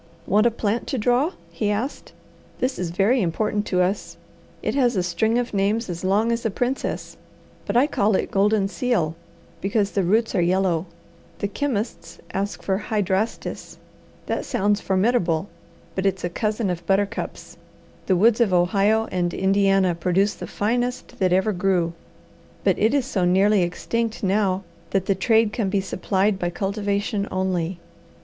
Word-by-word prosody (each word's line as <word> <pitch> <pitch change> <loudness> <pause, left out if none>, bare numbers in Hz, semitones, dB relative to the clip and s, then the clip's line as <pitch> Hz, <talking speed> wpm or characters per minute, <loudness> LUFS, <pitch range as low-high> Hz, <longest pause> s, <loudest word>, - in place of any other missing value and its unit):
"Want 210 +4 +4
a - - +5
plant 225 0 -2
to 270 - -2
draw?" 250 - +2 0.2
he 210 - -1
asked. 220 +7 -3 0.5
"This 255 +1 -1
is 180 -2 -2
very 205 +9 +2
important 205 +4 -1
to 180 -1 +2
us. 195 +3 -2 0.5
It - - 0
has 250 -4 +2
a 185 - +1
string 200 +7 +1
of 245 -1 -2
names 200 +1 0
as 170 0 -6
long 205 +5 +2
as 235 0 -1
a 225 - +1
princess, 245 +6 -3 0.5
but 205 +3 +1
I 255 - +6
call 215 -8 +1
it - - -1
goldenseal, 200 -2 +1 0.5
because 200 +1 0
the 200 - +1
roots 220 +6 +2
are 185 - +2
yellow. 180 -1 +1 0.5
The 200 - -1
chemists 210 -7 -3 0.2
ask 200 +2 -3
for 190 0 0
hydrastis. 210 0 -2 0.5
That - - -2
sounds 205 -4 0
formidable, 190 -3 +1 0.4
but 190 +2 0
it's 190 -1 -1
a 175 - -2
cousin 215 +1 -1
of 175 -1 -4
buttercups. 195 +1 -1 0.5
The 190 - +3
woods 225 +5 +4
of 220 -5 +3
Ohio 200 +5 +3
and 175 -1 0
Indiana 195 -1 +3
produce 185 +4 +1
the - - -8
finest 245 +4 -2
that 185 -2 +2
ever 190 +4 +2
grew, 180 -2 +1 0.7
but - - +2
it 225 +6 +3
is 275 -4 +1
so 205 -9 -1
nearly 195 +3 +4
extinct 225 +6 -2
now 195 -1 +1 0.3
that 195 -1 0
the 195 - +2
trade 220 +2 +2
can 210 -5 -1
be 200 +1 +1
supplied 195 +1 0
by 175 - 0
cultivation 200 +2 -1
only. 185 -2 -1
200 Hz, 160 wpm, -23 LUFS, 185-220 Hz, 0.7 s, I